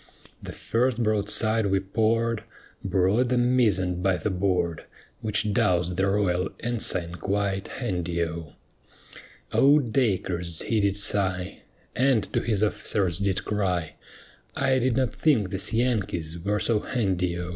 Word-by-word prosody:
The - - -7
first 120 0 0
broadside 110 +1 +1
we 95 0 +2
poured 110 +3 0 0.4
Brought 100 +6 +2
the 125 - +1
mizzen 105 -8 +2
by 95 -1 +2
the 105 - -2
board, 90 -3 -1 0.3
Which 105 -1 -1
doused 90 -2 +1
the 95 +2 +1
royal 95 -2 +1
ensign 105 -7 -2
quite 100 -1 -1
handy 90 -7 -2
O. 80 -2 -6 1.0
O 140 +2 +6
Dacres 95 - -1
he 115 - 0
did 100 -1 +1
sigh, 95 -3 -1 0.3
And 130 -3 +3
to - - +2
his 110 -3 0
officers 100 -4 0
did 100 -2 -1
cry, 90 -6 -1 0.6
"I 135 -1 +2
did 125 -1 +1
not 130 -3 +1
think 115 -12 +2
these 95 -1 -1
Yankees 100 -9 -1
were 105 +4 -1
so 110 +2 +1
handy 95 -8 -1
O." 90 0 -4
100 Hz, 135 wpm, -26 LUFS, 90-115 Hz, 1.0 s, O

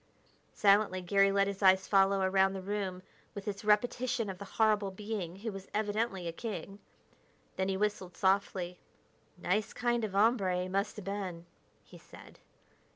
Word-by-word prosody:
Silently, 200 -2 +4
Garry 195 +2 +3
let 200 0 +3
his 200 0 -5
eyes 190 0 +5
follow 195 0 +4
around 190 0 +3
the 190 - -5
room 190 -2 -3 0.3
with 200 0 -7
its 200 0 -4
repetition 230 +1 +1
of 185 - -11
the 200 - -7
horrible 215 -3 +3
being 195 -3 -5
who 220 +3 -5
was 195 -1 -9
evidently 210 -3 -1
a - - -2
king. 200 +1 -6 0.8
Then 190 0 -1
he 190 - 0
whistled 200 -3 -2
softly. 190 -2 0 0.6
"Nice 200 +4 -1
kind 240 -1 0
of 210 -3 -3
hombre, 195 -4 +2
he - - -4
must 195 +2 -1
have 210 - -9
been," 190 -4 -4 0.4
he - - -15
said. - - -15
195 Hz, 160 wpm, -31 LUFS, 190-210 Hz, 0.8 s, eyes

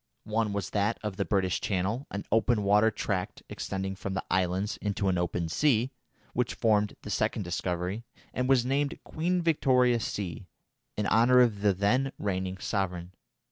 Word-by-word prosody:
One 110 0 0
was 100 -2 -3
that 105 +2 +1
of 105 -3 -3
the 100 - 0
British 95 +1 +1
Channel, 100 +7 -1
an 100 - -5
open 110 0 +3
water 105 +2 +5
tract 95 -3 -3
extending 95 0 -4
from 95 0 -4
the 95 - -2
islands 95 +2 0
into 100 -1 -1
an 90 -2 +1
open 85 -1 -1
sea, 125 - +2 0.4
which 125 0 -1
formed 105 -2 +2
the 105 - -6
second 110 +2 0
discovery, 90 +4 -2 0.3
and 125 +1 -1
was 125 -3 +4
named 140 +2 0
Queen 175 +2 -1
Victoria 125 -7 +3
Sea 100 -6 -4 0.5
in 105 - 0
honour 120 +4 +5
of 110 -5 +2
the 105 -1 +4
then 120 +8 +1
reigning 95 -2 -2
sovereign. 90 -3 -2
105 Hz, 165 wpm, -29 LUFS, 95-120 Hz, 0.5 s, water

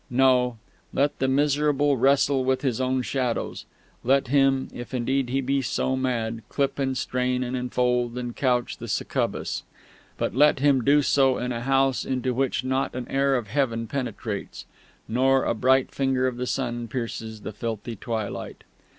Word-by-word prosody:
No: 125 -1 +3 0.3
let 145 +1 0
the 130 - +1
miserable 145 +1 +2
wrestle 135 +1 +3
with 130 +1 0
his 130 -3 0
own 130 0 0
shadows; 125 -3 -2 0.4
let 135 0 +2
him, 135 -1 +3
if 120 +2 -7
indeed 130 +1 0
he 135 +2 0
be 135 +1 0
so 130 +1 -1
mad, 115 -3 -1
clip 140 0 -1
and 130 -1 0
strain 125 0 0
and 125 +1 -3
enfold 125 -1 0
and 120 -1 -4
couch 125 -3 0
the - - -7
succubus; - - -2 0.6
but - - -1
let 150 +4 +5
him 135 -2 +3
do 145 +2 +4
so 135 -2 +3
in 125 0 -2
a 115 -1 -3
house 135 0 +2
into 130 -1 -1
which 130 -1 0
not 130 0 -1
an 125 -1 -4
air 135 0 +2
of 120 -3 -1
Heaven 115 -3 0
penetrates, 115 -4 -5 0.4
nor 130 +3 +2
a - - +1
bright 130 +3 +2
finger 135 -1 +1
of 125 -2 -1
the 125 0 -3
sun 120 -3 -2
pierces 115 -2 -5
the 110 - -6
filthy 115 +2 -4
twilight. 110 0 -5
130 Hz, 170 wpm, -25 LUFS, 120-135 Hz, 0.6 s, let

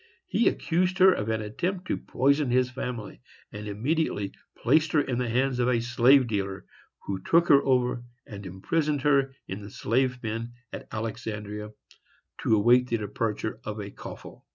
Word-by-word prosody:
He 235 - +2
accused 180 +2 +1
her 190 0 +7
of 105 -6 -3
an 110 -1 -1
attempt 180 - -3
to - - -1
poison 140 +2 +1
his 125 +1 +2
family, 125 - -6 0.3
and 105 +1 -7
immediately 105 -1 -1 0.3
placed 155 +5 +2
her 150 - +5
in 125 -3 -2
the 125 -2 -1
hands 130 +2 +1
of 120 - +2
a 120 -2 +2
slave 120 +3 +5
dealer, 100 -4 -3 0.4
who 95 -1 -3
took 170 - +3
her 140 -1 +7
over 125 -2 +1 0.2
and 100 -1 -9
imprisoned 145 - -1
her 140 -2 +3
in 95 +2 -5
the 100 - -9
slave 125 +5 0
pen 115 +1 -4 0.2
at - - -7
Alexandria, 105 -1 -5 0.7
to 110 - +3
await 120 +4 +4
the 115 - +1
departure 110 +1 -3
of 105 0 -5
a 100 -1 -6
coffle. - - -11
120 Hz, 170 wpm, -27 LUFS, 105-140 Hz, 0.7 s, her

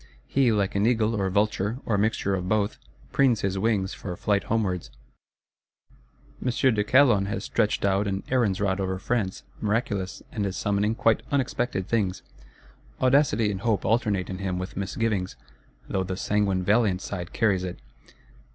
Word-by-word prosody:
He, 130 -3 +2
like 100 -3 +1
an 100 +2 +2
eagle 115 -2 +2
or 100 -3 0
vulture, 105 +2 0
or 110 - +1
mixture 100 -1 +1
of 90 -1 -2
both, 105 -1 0 0.3
preens 130 -5 +3
his 95 0 -1
wings 100 -3 0
for 90 -3 -6
flight 100 -2 0
homewards. 100 -6 -1 1.5
M. 125 - +1
de 120 -3 +2
Calonne 120 -5 +4
has 100 - -3
stretched - - 0
out 100 +1 +2
an 95 0 -2
Aaron's 115 -8 +2
Rod 100 -1 0
over 95 -1 -1
France; 100 -1 -2 0.2
miraculous; 105 -3 -2
and 105 - -2
is 95 - -4
summoning 105 +2 0
quite 115 -1 +2
unexpected 125 -7 -1
things. 100 -5 0 0.8
Audacity 130 -5 +3
and 95 -1 -5
hope 115 -1 0
alternate 110 -4 +1
in 95 -1 -5
him 95 -2 -2
with 90 0 -5
misgivings; 100 - -2 0.5
though 95 - -1
the 95 0 -4
sanguine 100 -3 +1
valiant 100 -2 +2
side 90 -3 -5
carries 100 -5 +1
it. 90 -1 -5
100 Hz, 160 wpm, -26 LUFS, 95-115 Hz, 1.5 s, Calonne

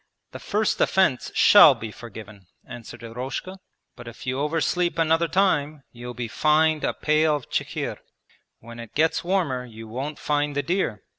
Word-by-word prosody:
'The - - -9
first 215 0 -1
offence 185 -10 +2
shall - - +8
be 110 -1 -7
forgiven,' 110 -4 -12 0.2
answered 120 -1 -10
Eroshka, 125 +11 -6 0.4
'but - - -12
if 115 - -10
you 130 +1 -2
oversleep 165 +4 0
another 165 +1 +2
time 155 -6 0
you'll 120 0 -9
be 120 0 -4
fined 155 +5 +2
a - - +1
pail 155 0 +2
of 145 - -8
chikhir. - - -3 0.6
When 115 +1 -12
it 115 -2 -11
gets 160 +2 +1
warmer 170 -9 -1
you 115 -2 -11
won't 135 +7 -5
find 145 -1 -1
the 145 - 0
deer.' 170 - -2
145 Hz, 160 wpm, -24 LUFS, 120-160 Hz, 0.6 s, shall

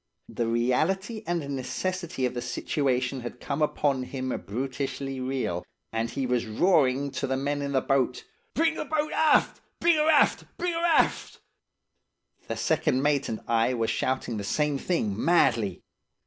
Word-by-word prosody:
The 115 - -2
reality 165 - 0
and 170 -4 -1
necessity 170 +2 -2
of 125 - -1
the 120 - -3
situation 130 -2 -1
had 120 0 -7
come 145 +1 -3
upon 145 -3 +1
him 130 0 -4 0.2
brutishly 135 +3 -3
real, 130 -9 -2 0.3
and 115 +1 -1
he 135 +3 -2
was 125 -2 0
roaring 140 - +2
to 135 - -2
the 130 0 0
men 145 +1 -1
in 140 0 -3
the 130 - +3
boat, 130 -2 +1 0.3
'Bring 325 +1 +3
the - - -4
boat 305 -1 -1
aft! 315 -1 +3 0.2
Bring 340 -1 +4
'er 305 +1 +3
aft! 305 -2 +4
Bring 355 -1 -1
'er 335 +1 -2
aft!' 340 -2 +2 1.1
The - - -3
second 130 +2 +1
mate 145 -1 +1
and 110 - -4
I 115 +2 +2
were 115 -1 0
shouting 125 -1 -1
the 100 - -4
same 150 +6 0
thing 110 - -1
madly. 120 - +2
135 Hz, 160 wpm, -27 LUFS, 125-165 Hz, 1.1 s, Bring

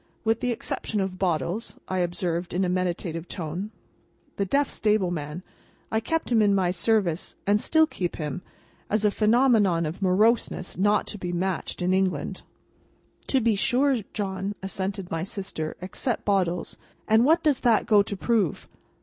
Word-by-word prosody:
"With 225 0 +1
the 250 - -1
exception 220 -2 -3
of 190 -1 -2
Bottles," 175 - -1
I 185 - -1
observed, 175 -1 -2
in 190 +1 +2
a - - 0
meditative 175 -2 -2
tone. 175 +4 -4 0.7
(The 200 - +1
deaf 280 +8 +2
stable 210 -4 +1
man. 155 +1 -5 0.5
I 220 - +2
kept 320 +6 -2
him 225 -2 +5
in 205 -1 +4
my 185 -2 +2
service, 180 -2 0
and 205 +1 +3
still 315 0 +4
keep 180 - -4
him, 150 0 -4 0.5
as 215 0 +1
a 210 - +4
phenomenon 215 -6 +3
of 155 +6 -5
moroseness 195 0 +2
not 205 +2 +2
to 210 - -6
be 180 -1 -3
matched 180 0 -2
in 180 +1 +2
England.) 185 -1 0 0.9
"To 265 - +3
be 225 -1 +3
sure, 260 +6 +2
John," 195 0 -3
assented 195 -1 -3
my 165 - -1
sister; 185 -4 -5
"except 225 +6 -3
Bottles. 180 -4 0 0.3
And 220 +1 +5
what 325 +5 +4
does 295 -4 +3
that 235 -3 +3
go 210 -2 +5
to 200 0 -3
prove? 210 -7 0
195 Hz, 165 wpm, -26 LUFS, 180-220 Hz, 0.9 s, him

